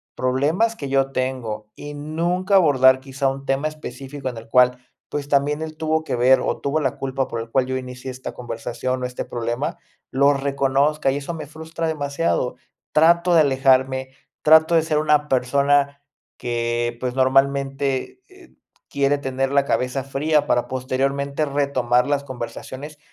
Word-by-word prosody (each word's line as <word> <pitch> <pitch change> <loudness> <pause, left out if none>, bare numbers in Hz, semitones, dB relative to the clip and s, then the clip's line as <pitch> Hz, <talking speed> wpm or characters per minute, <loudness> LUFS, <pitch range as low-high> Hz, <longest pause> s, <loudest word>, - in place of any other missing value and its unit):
problemas 150 - +1
que 140 -9 -6
yo 135 0 +1
tengo 120 -5 -3
y 145 0 -8
nunca 170 +6 -2
abordar 130 -7 +5
quizá 135 0 -2
un 135 +1 -7
tema 135 +3 +1
específico 140 -2 -7
en 120 - -8
el 115 - -10
cual, 125 +1 +4 0.3
pues, 145 -1 -4
también 145 +2 +1
él 155 0 -7
tuvo 160 0 0
que 125 - -2
ver 130 +2 +5
o - - -2
tuvo 145 +3 0
la 135 -4 -1
culpa 135 0 -2
por 115 - -4
el 115 - -8
cual 130 +1 +2
yo 130 0 -2
inicié 130 0 -7
esta 130 +1 -7
conversación 125 +1 -4
o 125 - -1
este 125 - -6
problema, 120 +4 -3 0.3
lo 140 +2 +4
reconozca 140 +1 +1
y 135 - 0
eso 145 +4 -5
me 155 -3 -7
frustra 160 +2 -5
demasiado. 145 -3 -1 0.3
Trato 170 +3 +4
de 165 - +7
alejarme, 130 -1 +2 0.3
trato 160 +2 +6
de 160 - +4
ser 155 -2 +1
una 150 -1 +2
persona, 140 +2 +2 0.4
que, 120 0 -2
pues, 125 0 -3
normalmente, 135 - +1
eh, 375 -2 -19 0.4
quiere 140 +1 +1
tener 135 -1 -2
la 140 0 +3
cabeza 130 0 -1
fría, 145 +3 +1
para 120 -3 +1
posteriormente 140 +3 -1
retomar 130 -4 +1
las 140 0 0
conversaciones, 130 +3 -7
135 Hz, 165 wpm, -22 LUFS, 130-150 Hz, 0.4 s, de